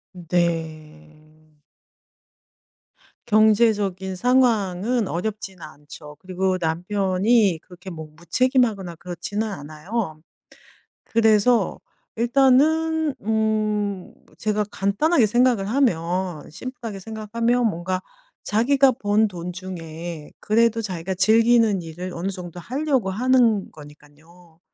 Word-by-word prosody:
음 175 - -11
네. 155 -2 -4 1.7
경제적인 210 -4 +2
상황은 230 -2 +1
어렵진 190 0 -4
않죠. 150 0 -12
그리고 185 0 -1
남편이 190 +3 +1
그렇게 180 +1 -12
뭐 160 -3 -8
무책임하거나 205 - 0
그렇지는 180 +6 -4
않아요. 155 +2 -5 0.8
그래서 220 -1 +2 0.4
일단은 290 +6 +3
음 215 -3 -1 0.2
제가 210 0 0
간단하게 230 - +2
생각을 240 -2 +2
하면 180 - -1
심플하게 230 -1 -7
생각하면 230 +3 -1
뭔가 185 0 -3 0.4
자기가 265 +4 +3
번 215 0 +1
돈 180 -2 -6
중에 170 -3 -8
그래도 230 +1 +2
자기가 185 -3 -4
즐기는 225 0 +4
일을 175 +3 -7
어느 180 +4 -3
정도 180 -2 -8
하려고 265 - -1
하는 235 -2 +2
거니깐요. 155 +3 -17
195 Hz, 235 characters per minute, -23 LUFS, 175-230 Hz, 1.7 s, 즐기는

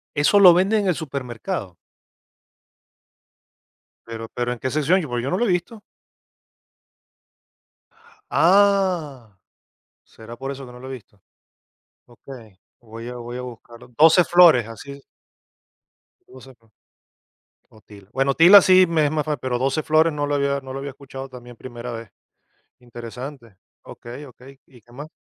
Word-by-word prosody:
¿Eso 150 +8 +3
lo 180 -3 +9
venden 200 +4 +2
en 195 - -2
el 180 - +1
supermercado? 130 - -6 2.3
Pero 115 0 -8
pero, 120 0 -2
¿en 120 - -6
qué 130 - -3
sección? 155 +7 +1
Porque 120 -1 -3
yo 135 - -3
no 180 - -1
lo 240 - 0
he 195 - +1
visto. 180 +5 -3 2.5
¡Ah! 175 - +1 0.7
¿Será 115 +1 -13
por 135 +3 -6
eso 135 -1 -10
que 125 - -13
no 125 - -13
lo 130 - -10
he 135 - -7
visto? 105 -5 -13 0.8
Okey, 120 -5 -15 0.2
voy 115 0 -11
a 125 - -8
voy 120 +1 -8
a - - -5
buscarlo. 120 -1 -12
12 165 +3 +6
flores, 165 -11 +5
así 140 +5 -11 1.3
12 135 - -14
flo 115 -2 -32 1.0
o 110 - -20
tila. 100 -2 -17
Bueno 135 0 0
tila 185 +5 +8
sí 185 0 +5
me 160 -3 +1
es - - -1
más 150 -1 -2
fa 150 -1 -2
pero 125 -1 -3
12 135 +4 -1
flores 155 +1 +2
no 145 -1 -3
lo 145 - -1
había 140 0 -1
no 130 -1 -10
lo 135 - -6
había 140 0 -6
escuchado, 135 0 -10
también 120 -2 -13
primera 120 0 -9
vez. 115 -3 -9 0.7
Interesante. 120 -1 -10 0.3
Okey, 125 +5 -11
okey, 135 +1 -16
¿y 125 -3 -20
qué 120 - -24
más? 145 +4 -9
135 Hz, 155 wpm, -21 LUFS, 120-155 Hz, 2.5 s, lo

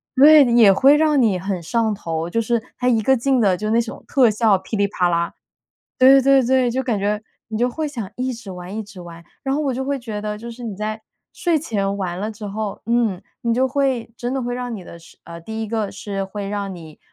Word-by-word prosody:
对 295 +2 +8
的， 240 - 0
也 225 -5 +7
会 275 +8 +5
让 300 -3 +3
你 210 -6 +2
很 185 -1 -3
上 220 +4 0
头， 165 -4 -4
就 230 +5 0
是 235 0 0 0.2
它 250 - 0
一 230 -3 +3
个 265 - +4
劲 265 +2 +1
的 190 -3 +3
就 215 +4 -3
那 230 - +3
种 230 - -8
特 250 -6 +4
效 215 -2 +3
霹 205 - -6
雳 200 0 +2
啪 180 -3 0
啦。 170 0 0 0.7
对 265 +1 +7
对 275 0 +5
对， 255 0 +3
就 260 +3 -1
感 235 -5 -1
觉 210 +2 -1 0.3
你 220 - -4
就 245 +2 +1
会 310 +5 -3
想 230 -9 -6
一 255 +1 -2
直 225 -4 -10
玩 180 +2 -8
一 220 - -3
直 205 -3 -12
玩， 170 -1 -11 0.2
然 270 0 0
后 305 - 0
我 270 -3 0
就 265 - -3
会 280 +1 -1
觉 220 -4 -6
得， 210 0 -4
就 235 +2 -8
是 240 +1 -9
你 220 -4 -4
在 215 +1 -4 0.3
睡 340 -3 0
前 200 -9 -2
玩 180 -3 -3
了 210 +2 -3
之 215 0 -10
后， 210 0 -5
嗯， 230 -6 +1 0.2
你 230 -1 +1
就 260 +1 +2
会 260 -4 -1
真 245 +2 -3
的 265 - -1
会 245 0 -3
让 245 -2 -4
你 195 - -7
的 170 - -11
睡 165 - -18
呃， 170 0 -9
第 220 +6 -5
一 215 - -5
个 220 -3 -2
是 195 0 -4
会 200 0 -6
让 200 -2 -4
你 160 -3 -12
220 Hz, 270 characters per minute, -21 LUFS, 195-250 Hz, 0.7 s, 对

